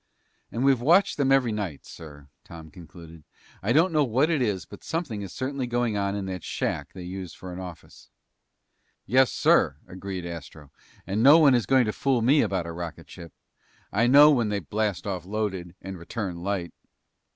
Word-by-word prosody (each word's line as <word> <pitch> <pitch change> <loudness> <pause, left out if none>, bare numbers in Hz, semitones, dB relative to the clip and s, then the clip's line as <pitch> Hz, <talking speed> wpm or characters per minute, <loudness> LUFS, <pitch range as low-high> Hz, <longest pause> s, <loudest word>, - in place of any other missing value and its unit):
"And 120 - -2
we've 135 -3 +3
watched 175 +9 +3
them 135 -2 +1
every 130 -4 +3
night, 100 -9 -5
sir," 75 -3 -12 0.2
Tom 80 -2 -12
concluded. 85 -2 -13 0.4
"I 100 +4 -1
don't 165 +6 +3
know 150 -1 +3
what 135 +6 +1
it 155 -5 +1
is, 100 -7 -1
but - - -13
something 120 - -4
certainly 130 +3 -4
is - - -10
going 120 -2 0
on 100 0 -1
in 100 -1 -4
that 95 -3 -6
shack - - -3
they 90 - -9
use 90 -1 -7
for 90 -1 -9
an 90 - -7
office." 90 -3 -11 1.0
"Yes, 130 +4 +3
sir," 70 - +3
agreed 95 -1 -7
Astro, 80 -4 -9 0.3
"and 100 +4 -1
no 140 +6 +8
one 150 -5 +6
is 120 -3 +1
going 130 -2 +4
to 105 - -2
fool 130 -4 0
me 140 +5 +4
about 95 -3 -1
a 85 - -6
rocket 85 -1 -8
ship. 85 -2 -11 0.6
I 115 +4 +2
know 145 +4 +8
when 120 -7 +1
they 105 - -1
blast 100 +1 -2
off 95 -4 -3
loaded 95 -3 -4
and 95 -1 -7
return 90 0 -5
light." 90 -1 -3
100 Hz, 190 wpm, -26 LUFS, 90-130 Hz, 1.0 s, no